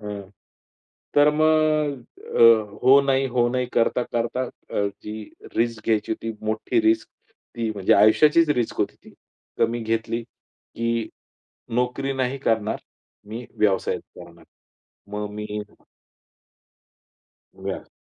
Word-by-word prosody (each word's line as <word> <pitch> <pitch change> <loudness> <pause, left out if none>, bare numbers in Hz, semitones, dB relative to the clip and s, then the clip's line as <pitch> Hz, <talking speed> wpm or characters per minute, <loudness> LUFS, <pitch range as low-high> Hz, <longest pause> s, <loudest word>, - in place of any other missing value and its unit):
अ, 105 -2 -7 0.9
तर 145 +1 +7
मग 155 -3 +2 0.4
अ, - - +6 0.4
हो 135 +2 +7
नाही 135 -1 +2
हो 120 0 +4
नाही 125 0 0
करता-करता 120 +1 0 0.3
अ, 100 - 0 0.2
जी 105 - -5 0.4
रिस्क 115 -2 0
घ्यायची 110 -1 +1
होती, 115 0 -4
मोठी 110 - 0
रिस्क 330 0 +2 0.5
ती 115 -1 -1
म्हणजे 95 -2 +2
आयुष्याचीच 150 +9 +5
रिस्क 125 -6 0
होती - - 0
ती. - - -15 0.5
तर - - +4
मी 120 0 -3
घेतली 115 +1 -1
की 115 0 -5 0.7
नोकरी 125 +3 0
नाही 130 +1 -1
करणार, 110 -5 0 0.5
मी 115 +3 -7
व्यवसायाच 100 -3 +1 0.2
करणार. 85 -1 -13 0.6
मग 105 0 -4
मी 105 0 -4 2.0
व्यव - - -6
115 Hz, 115 wpm, -24 LUFS, 110-135 Hz, 2.0 s, तर